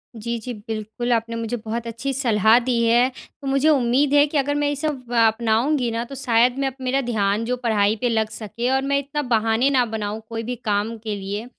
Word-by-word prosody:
जी, 235 Hz, +1 st, -3 dB
जी, 245 Hz, +3 st, -6 dB
बिल्कुल। 220 Hz, +2 st, -5 dB
आपने 230 Hz, 0 st, -1 dB
मुझे 230 Hz, +1 st, -3 dB
बहुत 230 Hz, +1 st, -5 dB
अच्छी 235 Hz, +4 st, -4 dB
सलाह 225 Hz, -4 st, +4 dB
दी 240 Hz, -2 st, +1 dB
है। 240 Hz, +3 st, +4 dB, 0.3 s
तो 275 Hz, -, -6 dB
मुझे 275 Hz, +3 st, +2 dB
उम्मीद 270 Hz, +1 st, +2 dB
है 290 Hz, 0 st, +6 dB
कि 295 Hz, 0 st, -2 dB
अगर 290 Hz, +1 st, +1 dB
मैं 290 Hz, 0 st, +1 dB
ये 290 Hz, -, 0 dB
सब 275 Hz, -5 st, -3 dB, 0.2 s
अपनाऊँगी 235 Hz, +4 st, +1 dB
ना 230 Hz, +1 st, -2 dB
तो 275 Hz, +3 st, -9 dB
शायद 245 Hz, 0 st, +2 dB
मैं 275 Hz, -, +1 dB
अप 265 Hz, -, -5 dB
मेरा 260 Hz, +2 st, 0 dB
ध्यान 205 Hz, +1 st, 0 dB
जो 250 Hz, +1 st, -1 dB
पढ़ाई 215 Hz, -2 st, +2 dB
पे 245 Hz, -, +1 dB
लग 220 Hz, -1 st, 0 dB
सके 220 Hz, +3 st, -4 dB
और 265 Hz, -, +1 dB
मैं 280 Hz, -, +3 dB
इतना 285 Hz, +2 st, -3 dB
बहाने 225 Hz, +4 st, +2 dB
ना 255 Hz, -3 st, +3 dB
बनाऊँ 210 Hz, +1 st, -4 dB
कोई 225 Hz, 0 st, -4 dB
भी 245 Hz, +2 st, -4 dB
काम 215 Hz, 0 st, -2 dB
के 215 Hz, -1 st, -4 dB
लिए। 200 Hz, +3 st, -5 dB
235 Hz, 225 wpm, -22 LUFS, 220-265 Hz, 0.3 s, है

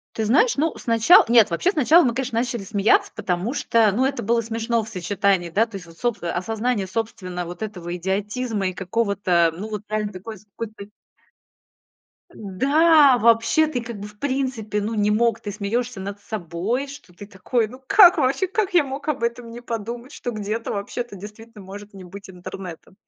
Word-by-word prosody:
Ты 220 Hz, -, -1 dB
знаешь, 300 Hz, -, +3 dB
ну, 310 Hz, +3 st, 0 dB
снача 230 Hz, +9 st, +5 dB
нет, 230 Hz, -4 st, +5 dB
вообще 260 Hz, -, +1 dB
сначала 315 Hz, 0 st, +5 dB
мы, 235 Hz, -, +1 dB
конечно, 255 Hz, -3 st, -1 dB
начали 240 Hz, -4 st, -2 dB
смеяться, 220 Hz, -, +2 dB
потому 185 Hz, +8 st, -2 dB
что, 225 Hz, -6 st, +2 dB
ну, 255 Hz, +6 st, +1 dB
это 275 Hz, -4 st, -2 dB
было 230 Hz, +2 st, +2 dB
смешно 230 Hz, +1 st, -1 dB
в 215 Hz, -, -8 dB
сочетании, 190 Hz, -2 st, 0 dB
да, 215 Hz, +7 st, +2 dB
то 225 Hz, -3 st, -12 dB
есть 180 Hz, -2 st, -7 dB
вот 165 Hz, 0 st, -16 dB
соб 240 Hz, -2 st, -1 dB
а, 170 Hz, -, -3 dB
осознание 215 Hz, +2 st, -2 dB
собственно 185 Hz, -5 st, -4 dB
вот 175 Hz, +3 st, -9 dB
этого 180 Hz, -5 st, -5 dB
идиотизма 200 Hz, +2 st, -2 dB
и -, -, -7 dB
какого-то, 185 Hz, -4 st, +1 dB
ну 210 Hz, +3 st, -5 dB
вот 210 Hz, -1 st, -4 dB
реально 215 Hz, -1 st, -2 dB
такой 215 Hz, +4 st, -8 dB
с 210 Hz, -, -21 dB
какой-то. 210 Hz, 0 st, -8 dB, 1.5 s
Да, 280 Hz, -, +4 dB
вообще 230 Hz, +7 st, +4 dB
ты 255 Hz, -6 st, -3 dB
как 235 Hz, -3 st, -7 dB
бы 205 Hz, -, -7 dB
в 210 Hz, 0 st, -16 dB
принципе 255 Hz, -7 st, -2 dB
ну 220 Hz, +2 st, -3 dB
не 210 Hz, 0 st, +2 dB
мог, 230 Hz, +1 st, +2 dB
ты 205 Hz, -, -5 dB
смеёшься 230 Hz, +2 st, -3 dB
над 200 Hz, +1 st, -6 dB
собой, 210 Hz, -, -3 dB
что 275 Hz, -10 st, -12 dB
ты 200 Hz, +3 st, -11 dB
такой. 220 Hz, +4 st, -1 dB
Ну 255 Hz, +4 st, -13 dB
как 390 Hz, -2 st, +7 dB
вообще, 285 Hz, +6 st, +1 dB
как 390 Hz, 0 st, -1 dB
я 345 Hz, -, +5 dB
мог 275 Hz, +2 st, -7 dB
об 275 Hz, -6 st, -1 dB
этом 235 Hz, 0 st, -3 dB
не 240 Hz, -, -9 dB
подумать, 235 Hz, +2 st, -6 dB
что 245 Hz, -4 st, -5 dB
где-то 215 Hz, +1 st, -4 dB
вообще-то 205 Hz, +2 st, -5 dB
действительно 210 Hz, +2 st, -12 dB
может 200 Hz, +2 st, -10 dB
не 190 Hz, -1 st, -11 dB
быть 195 Hz, +2 st, -11 dB
интернета? 180 Hz, -1 st, -9 dB
220 Hz, 190 wpm, -22 LUFS, 200-245 Hz, 1.5 s, как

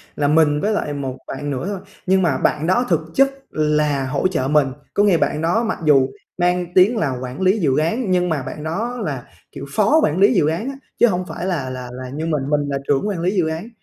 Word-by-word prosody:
là 145 Hz, -, +1 dB
mình 150 Hz, -1 st, +3 dB
với 210 Hz, +1 st, +1 dB
lại 150 Hz, -7 st, -2 dB
một 135 Hz, -2 st, -4 dB
bạn 145 Hz, +2 st, -5 dB
nữa 130 Hz, +2 st, -3 dB
thôi, 200 Hz, -2 st, -3 dB, 0.3 s
nhưng 190 Hz, +1 st, +3 dB
mà 160 Hz, -7 st, +1 dB
bạn 150 Hz, +2 st, 0 dB
đó 240 Hz, +7 st, +2 dB
thực 165 Hz, -4 st, +3 dB
chất 275 Hz, +6 st, +4 dB, 0.2 s
là 150 Hz, -3 st, +1 dB
hỗ 140 Hz, +6 st, +1 dB
trợ 160 Hz, -8 st, -1 dB
mình, 150 Hz, -1 st, +3 dB, 0.3 s
có 205 Hz, -, +3 dB
nghĩa 195 Hz, -5 st, +4 dB
bạn 150 Hz, -, 0 dB
đó 175 Hz, +8 st, +1 dB
mặc 225 Hz, -, -2 dB
dù 135 Hz, -3 st, +4 dB, 0.3 s
mang 180 Hz, 0 st, +1 dB
tiếng 195 Hz, +6 st, +5 dB
là 150 Hz, -9 st, 0 dB
quản 130 Hz, +5 st, -6 dB
lý 190 Hz, +3 st, +3 dB
dự 140 Hz, -8 st, +2 dB
án 185 Hz, +7 st, 0 dB
nhưng 180 Hz, -1 st, +2 dB
mà 155 Hz, -4 st, -1 dB
bạn 150 Hz, -, -7 dB
đó 220 Hz, +10 st, -3 dB
là, 135 Hz, -5 st, -4 dB, 0.3 s
kiểu, 140 Hz, -, -8 dB
phó 220 Hz, +10 st, +4 dB
quản 155 Hz, +4 st, +1 dB
lý 200 Hz, +5 st, +5 dB
dự 170 Hz, -9 st, +3 dB
án 170 Hz, +11 st, -1 dB
á, 275 Hz, -, -6 dB, 0.2 s
chứ 240 Hz, -, +6 dB
hông 180 Hz, -4 st, -1 dB
phải 180 Hz, -, -6 dB
là 160 Hz, -9 st, -2 dB
là 130 Hz, -1 st, -6 dB
là 130 Hz, +1 st, -7 dB
như 150 Hz, +5 st, -4 dB
mình, 150 Hz, -4 st, -1 dB
mình 150 Hz, -1 st, +2 dB
là 140 Hz, -, -1 dB
trưởng 145 Hz, +8 st, +1 dB
quản 200 Hz, -4 st, -2 dB
lý 180 Hz, +2 st, +1 dB
dự 175 Hz, -4 st, +2 dB
án. 160 Hz, +7 st, -4 dB
160 Hz, 250 wpm, -20 LUFS, 145-190 Hz, 0.3 s, chứ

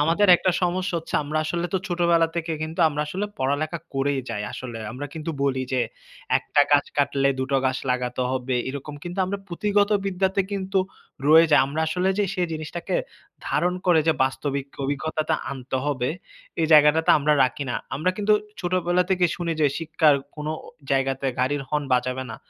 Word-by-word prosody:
আমাদের 170 Hz, +7 st, +3 dB
একটা 185 Hz, -, +1 dB
সমস্যা 185 Hz, +2 st, 0 dB
হচ্ছে 165 Hz, -, -9 dB
আমরা 155 Hz, +2 st, -2 dB
আসলে 170 Hz, +2 st, -1 dB
তো -, -, +3 dB
ছোটবেলা 170 Hz, -1 st, +3 dB
থেকে 165 Hz, -1 st, -2 dB
কিন্তু 160 Hz, +3 st, -4 dB
আমরা 150 Hz, 0 st, -2 dB
আসলে 190 Hz, +7 st, -3 dB
পড়ালেখা 145 Hz, +5 st, -1 dB, 0.2 s
করেই 135 Hz, 0 st, 0 dB
যাই, 105 Hz, -2 st, -3 dB
আসলে। 120 Hz, -3 st, -6 dB
আমরা 140 Hz, +4 st, -5 dB
কিন্তু 160 Hz, +1 st, -4 dB
বলি 130 Hz, -2 st, +1 dB
যে, 130 Hz, -, +2 dB, 0.6 s
"১ -, -, -5 dB
টা 145 Hz, -, +7 dB
গাছ 145 Hz, 0 st, +4 dB
কাটলে, 140 Hz, -1 st, +2 dB
২ 130 Hz, -, 0 dB
টো -, -, +4 dB
গাছ 130 Hz, 0 st, 0 dB
লাগাতে 125 Hz, 0 st, -1 dB
হবে", 130 Hz, -1 st, -1 dB
এরকম 140 Hz, +2 st, -6 dB
কিন্তু 175 Hz, +2 st, -6 dB
আমরা 200 Hz, +1 st, -3 dB
পুঁথিগত 205 Hz, +3 st, +1 dB, 0.2 s
বিদ্যাতে 190 Hz, +1 st, +1 dB
কিন্তু 195 Hz, -1 st, -1 dB, 0.5 s
রয়ে 160 Hz, +2 st, +8 dB
যাই। 145 Hz, -, +7 dB
আমরা 145 Hz, +3 st, -3 dB
আসলে 180 Hz, +4 st, 0 dB
যে, 205 Hz, -, +3 dB
সেই 180 Hz, -1 st, 0 dB
জিনিসটাকে 155 Hz, -, -3 dB, 0.5 s
ধারণ 180 Hz, +1 st, +1 dB
করে 175 Hz, -3 st, +5 dB
যে, -, -, +6 dB
বাস্তবিক 135 Hz, +1 st, -2 dB, 0.2 s
অভিজ্ঞতাটা 155 Hz, +3 st, -1 dB, 0.2 s
আনতে 130 Hz, -1 st, -4 dB
হবে, 130 Hz, -4 st, 0 dB, 0.5 s
এই 160 Hz, -, +3 dB
জায়গাটাতে 150 Hz, +1 st, +6 dB
আমরা 150 Hz, +1 st, +2 dB
রাখি 130 Hz, +3 st, -3 dB
না। -, -, -2 dB, 0.2 s
আমরা 160 Hz, +6 st, +1 dB
কিন্তু 210 Hz, 0 st, +2 dB, 0.3 s
ছোটবেলা 180 Hz, 0 st, +1 dB
থেকে 185 Hz, -1 st, +3 dB
শুনি 170 Hz, -1 st, -2 dB
যে, 150 Hz, -, +5 dB
শিক্ষার 160 Hz, -2 st, +3 dB, 0.2 s
কোন 150 Hz, 0 st, -6 dB, 0.4 s
জায়গাতে 135 Hz, 0 st, 0 dB
গাড়ির 140 Hz, +2 st, 0 dB
হর্ন 150 Hz, -1 st, 0 dB
বাজাবে 125 Hz, +1 st, 0 dB
না। -, -, -6 dB
155 Hz, 180 wpm, -24 LUFS, 135-175 Hz, 0.6 s, রয়ে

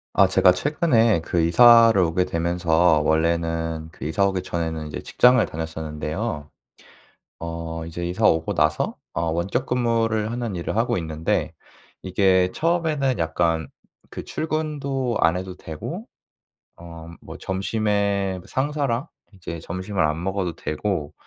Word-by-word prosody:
아 -, -, +6 dB
제가 90 Hz, -, +5 dB
최근에 115 Hz, -, +2 dB
그 85 Hz, +1 st, 0 dB
이사를 115 Hz, +5 st, +7 dB
오게 90 Hz, 0 st, +2 dB
되면서 85 Hz, -1 st, +2 dB
원래는 80 Hz, 0 st, 0 dB
그 -, -, -9 dB
이사 80 Hz, +6 st, +1 dB
오기 95 Hz, -2 st, -2 dB
전에는 80 Hz, -3 st, -3 dB
이제 75 Hz, -, -6 dB
직장을 125 Hz, -1 st, +4 dB
다녔었는데요. 80 Hz, +2 st, -5 dB, 0.9 s
어 80 Hz, 0 st, -5 dB
이제 85 Hz, +1 st, -5 dB
이사 95 Hz, +5 st, -2 dB
오고 80 Hz, 0 st, +2 dB
나서 75 Hz, 0 st, +1 dB, 0.2 s
어 85 Hz, -, -2 dB
원격근무를 115 Hz, +3 st, 0 dB
하는 120 Hz, -5 st, -3 dB
일을 85 Hz, -, -3 dB
하고 115 Hz, -, +1 dB
있는데 80 Hz, -2 st, -2 dB, 0.5 s
이게 95 Hz, -1 st, +2 dB
처음에는 155 Hz, -, 0 dB
약간 80 Hz, 0 st, 0 dB, 0.4 s
그 -, -, -8 dB
출근도 140 Hz, -6 st, -2 dB
안 80 Hz, +2 st, +3 dB
해도 95 Hz, 0 st, -5 dB
되고 80 Hz, -3 st, -7 dB, 0.7 s
어 85 Hz, -1 st, -10 dB
음 85 Hz, -, -12 dB
뭐 -, -, -10 dB
점심에 100 Hz, -1 st, -1 dB
상사랑 140 Hz, -1 st, -1 dB, 0.3 s
이제 85 Hz, -3 st, -7 dB
점심을 95 Hz, +4 st, -4 dB
안 75 Hz, +2 st, 0 dB
먹어도 95 Hz, -3 st, -2 dB
되고 75 Hz, -2 st, -3 dB
90 Hz, 275 characters per minute, -23 LUFS, 80-115 Hz, 0.9 s, 이사를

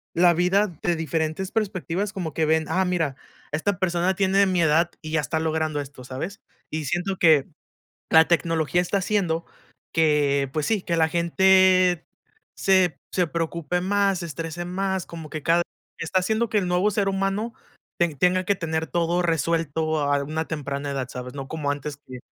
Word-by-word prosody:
la 175 Hz, 0 st, +5 dB
vida 180 Hz, +5 st, +2 dB
de 175 Hz, -, +1 dB
diferentes 160 Hz, +3 st, -2 dB
perspectivas, 200 Hz, -2 st, -2 dB
como 175 Hz, -7 st, -4 dB
que 160 Hz, -, +1 dB
ven: 160 Hz, 0 st, +2 dB
"Ah 185 Hz, +4 st, +1 dB
mira, 165 Hz, -6 st, 0 dB, 0.4 s
esta 180 Hz, +6 st, -1 dB
persona 180 Hz, 0 st, +1 dB
tiene 195 Hz, +1 st, +3 dB
mi 185 Hz, -2 st, +1 dB
edad 160 Hz, +2 st, +3 dB
y 155 Hz, -, -6 dB
ya 160 Hz, -, +2 dB
está 160 Hz, +2 st, -2 dB
logrando 160 Hz, -1 st, -1 dB
esto, 140 Hz, -2 st, -10 dB
¿sabes?". 135 Hz, +10 st, -6 dB, 0.3 s
Y 155 Hz, -1 st, -3 dB
siento 180 Hz, +5 st, -1 dB
que, 155 Hz, -5 st, +5 dB, 0.6 s
la 160 Hz, 0 st, +6 dB
tecnología 165 Hz, 0 st, +1 dB
está 195 Hz, +3 st, 0 dB
haciendo 180 Hz, -4 st, 0 dB, 0.5 s
que, 145 Hz, -4 st, +2 dB
pues 155 Hz, -1 st, -1 dB
sí, 215 Hz, -4 st, +1 dB
que 170 Hz, -, -1 dB
la 160 Hz, -1 st, +3 dB
gente 185 Hz, +1 st, +4 dB, 0.5 s
se 185 Hz, -3 st, +3 dB
se 180 Hz, -2 st, +2 dB
preocupe 170 Hz, +1 st, -2 dB
más, 195 Hz, 0 st, +1 dB
se 170 Hz, -, -4 dB
estrese 165 Hz, +2 st, -5 dB
más, 190 Hz, 0 st, -2 dB
como 160 Hz, -3 st, -9 dB
que 155 Hz, -, -5 dB
cada 170 Hz, +2 st, +3 dB, 0.4 s
está 165 Hz, +3 st, 0 dB
haciendo 220 Hz, +5 st, 0 dB
que 215 Hz, -, +2 dB
el 185 Hz, -3 st, -1 dB
nuevo 180 Hz, +4 st, +2 dB
ser 200 Hz, 0 st, +1 dB
humano 195 Hz, +4 st, -1 dB, 0.4 s
te 170 Hz, -3 st, +1 dB
tenga 180 Hz, +4 st, +2 dB
que 200 Hz, -, +2 dB
tener 160 Hz, -2 st, -2 dB
todo 175 Hz, +1 st, 0 dB
resuelto 160 Hz, -1 st, 0 dB
a 145 Hz, 0 st, +1 dB
una 160 Hz, +2 st, -3 dB
temprana 140 Hz, -2 st, -4 dB
edad, 130 Hz, -2 st, -3 dB
¿sabes? 125 Hz, +1 st, -7 dB
No 135 Hz, -1 st, -6 dB
como 150 Hz, -3 st, -2 dB
antes 145 Hz, 0 st, -5 dB
que: 130 Hz, -1 st, -8 dB
170 Hz, 175 wpm, -24 LUFS, 155-185 Hz, 0.6 s, la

